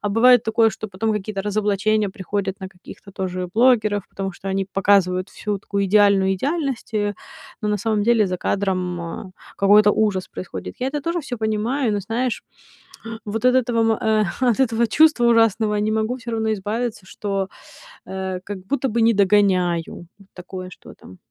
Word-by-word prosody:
А 205 - -2
бывает 245 +3 +5
такое, 225 0 +2
что 215 - -7
потом 215 +3 -2
какие-то 205 -1 -3
разоблачения 210 0 0
приходят 190 +1 -4
на 190 - -6
каких-то 190 +1 -14
тоже 185 -2 -3
блогеров, 215 -4 +3
потому 195 -1 -5
что 195 +2 -8
они 195 0 -1
показывают 190 -1 +2
всю 205 -2 -4
такую 200 0 -2
идеальную 200 -1 +4
идеальность, 275 - -3
э, 205 -1 0 0.5
но 210 - -2
на 210 - +1
самом 210 0 0
деле 225 -2 +3
за 180 -1 -3
кадром, 185 -3 -1 0.3
э, - - -16 0.3
какой-то 205 +1 +6
ужас 200 -4 0
происходит. 185 - -7
Я 255 - -2
это 290 0 -4
тоже 335 +2 -1
всё 260 -4 -6
понимаю, 220 +3 0
но 205 - -1
знаешь, 230 +5 -2 0.8
вот 220 +3 -3
от 255 0 +5
этого, 230 -3 +2
эм, 215 -1 +2 0.2
от 245 -1 +2
этого 230 -2 +2
чувства 310 -1 +4
ужасного 225 -2 +3
не 215 +1 0
могу 220 +3 -1
всё 245 -2 -7
равно 220 -1 0
избавиться, 215 +1 -3
что, 195 -2 -3 0.6
э, 190 -1 -4
как 205 -2 -6
будто 280 -1 0
бы 230 +1 0
не 230 0 +4
догоняю. 185 -4 +1 0.3
Такое, 185 0 -8
что - - -13
там. 90 - -15
210 Hz, 170 wpm, -21 LUFS, 195-225 Hz, 0.8 s, какой-то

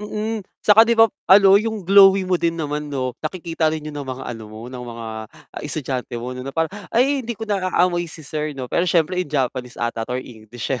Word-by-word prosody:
Mm, 215 +1 -3 0.2
tsaka 220 +2 +7
'di 235 - +3
ba 225 -2 +5 0.2
ano, 195 +1 +7
yung 220 -3 -4
glowy 195 0 +6
mo 185 -1 0
din 165 0 0
naman 150 -2 -3
'no 130 -3 -2
nakikita 165 0 -1
rin 155 -1 -3
yun 155 - -6
ng 140 - -8
mga 130 0 -5
ano 115 -3 -7
mo, 110 +2 -10
ng 125 - -7
mga 115 -2 -7 0.6
estudyante 130 -5 -4
mo 120 +2 -5
'no 125 - -7
na 130 - -6
parang, 160 +4 -1 0.2
"Ay 270 +4 +2
hindi 235 -2 -5
ko 225 - -5
naaamoy 185 -4 0
si 155 -1 -12
sir 150 0 -4
'no," 130 -2 -7
pero 180 +1 +2
syempre 175 +2 +2
in 180 - -4
Japanese 130 -3 -2
'ata 120 -1 -2
'to 125 - -2
or - - -2
English, 110 +1 -7
eh, 130 - -1
155 Hz, 230 wpm, -21 LUFS, 130-195 Hz, 0.6 s, tsaka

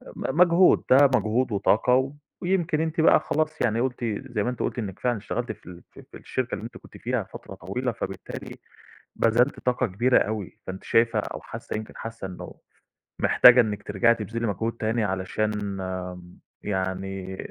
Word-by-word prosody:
م 145 +6 -3
مجهود، 180 +1 +6
ده 140 +2 +8
مجهود 115 +3 +1
وطاقة، 125 +7 +2 0.3
ويمكن 175 -4 +1
أنتِ 160 0 0
بقى - - +6
خلاص 155 +1 -2
يعني 115 -1 +1
قلتِ 125 -1 -2 0.3
زي 105 -3 0
ما 120 - 0
أنتِ 125 - -5
قلتِ - - -2
إنِّك 100 -5 -5
فعلًا 120 -2 0
اشتغلتِ 110 +3 -3
في 105 - -12
ال 90 -1 -11
في - - -13
في - - -9
الشركة - - -3
اللي - - -8
أنتِ - - -9
كنتِ - - -15
فيها - - -1
فترة - - -9
طويلة، 125 +9 -3
فبالتالي 95 -4 -7 0.6
بذلتِ 120 +4 +2
طاقة 125 0 0
كبيرة 120 +6 +3
أوي، 105 -3 -3
فأنتِ 95 0 -6
شايفة 115 -1 +3
أو - - -5
حاسة - - -7
يمكن 110 - -7
حاسة 115 -4 -6
إنه 90 - -9 0.7
محتاجة 125 0 +7
إنِّك 105 -3 -3
ترجعي 115 +4 +3
تبذلي 115 +2 -3
مجهود 110 +3 -2
تاني 115 0 -1
علشان 100 +2 -1 1.1
يعني 95 -1 -3
115 Hz, 170 wpm, -25 LUFS, 100-125 Hz, 1.1 s, ده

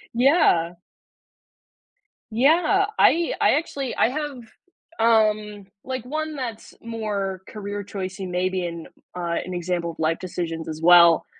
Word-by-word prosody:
Yeah. 245 - +3 1.6
Yeah, 320 - +3
I 335 0 +4
I - - +5
actually 280 -4 -3
I - - +3
have, 295 0 -4 0.6
um, 215 -2 +2 0.2
like 260 -2 -4
one 310 +3 -4
that's 240 -5 -6
more 205 -5 -4
career 205 -1 -6
choice 190 -1 -6
and 185 -2 -5
maybe 185 0 -1
and, 170 -1 -6 0.3
uh, 170 -1 -2
an 185 - -6
example 175 -1 -2
of 165 - -17
life 160 +1 0
decisions 165 -3 -5
as 155 0 -6
well. 170 -1 +7
205 Hz, 130 wpm, -23 LUFS, 175-255 Hz, 1.6 s, well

